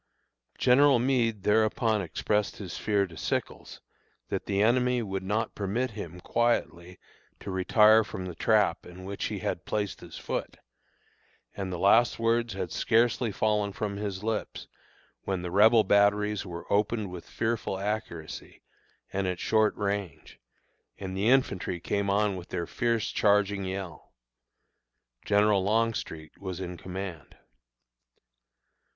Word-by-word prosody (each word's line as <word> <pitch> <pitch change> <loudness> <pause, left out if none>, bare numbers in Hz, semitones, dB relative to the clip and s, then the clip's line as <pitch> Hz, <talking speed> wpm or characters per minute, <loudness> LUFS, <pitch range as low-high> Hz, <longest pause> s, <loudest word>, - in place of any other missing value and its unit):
General 135 +1 +5
Meade 120 -5 +1
thereupon 110 +1 +2
expressed 105 +3 -1
his 95 -4 -7
fear 105 -2 +1
to 85 -3 -12
Sickles - - -4 0.5
that - - -3
the 100 -1 0
enemy 125 +2 +3
would 95 -2 -3
not 105 +4 -1
permit 110 +6 -2
him 90 -5 -8
quietly 90 -7 -1 0.4
to 100 - -6
retire 105 +4 +5
from 105 -3 -6
the 90 - -5
trap 105 -1 +2
in 90 +1 -11
which 100 0 -4
he - - -3
had - - -3
placed 105 -3 -3
his - - -10
foot; - - -4 1.0
and 95 -2 -4
the 90 - -3
last 115 +6 +4
words 115 -1 +1
had 95 -4 -4
scarcely 115 0 +2
fallen 105 0 0
from 100 0 -4
his 100 -1 -4
lips, 110 -1 -3 0.6
when 95 -2 -2
the 90 - -4
Rebel 110 +4 +6
batteries 105 0 +2
were 85 -1 -7
opened 105 -1 0
with 90 -2 -9
fearful 110 -4 -2
accuracy 100 -6 -5 0.5
and 95 -1 -1
at 90 -1 -1
short 110 -1 +2
range, 100 -6 -4 0.6
and 95 -1 -6
the 100 +4 +1
infantry 100 -9 +1
came 100 +3 -1
on 100 0 +2
with 90 -1 -9
their 85 - -3
fierce 115 +3 -1
charging 100 -1 +2
yell. 95 -4 -6 1.1
General 105 -1 +3
Longstreet 105 -7 -1
was 95 -2 -5
in 90 -1 -5
command. 90 -3 -7
100 Hz, 135 wpm, -28 LUFS, 95-110 Hz, 1.1 s, Rebel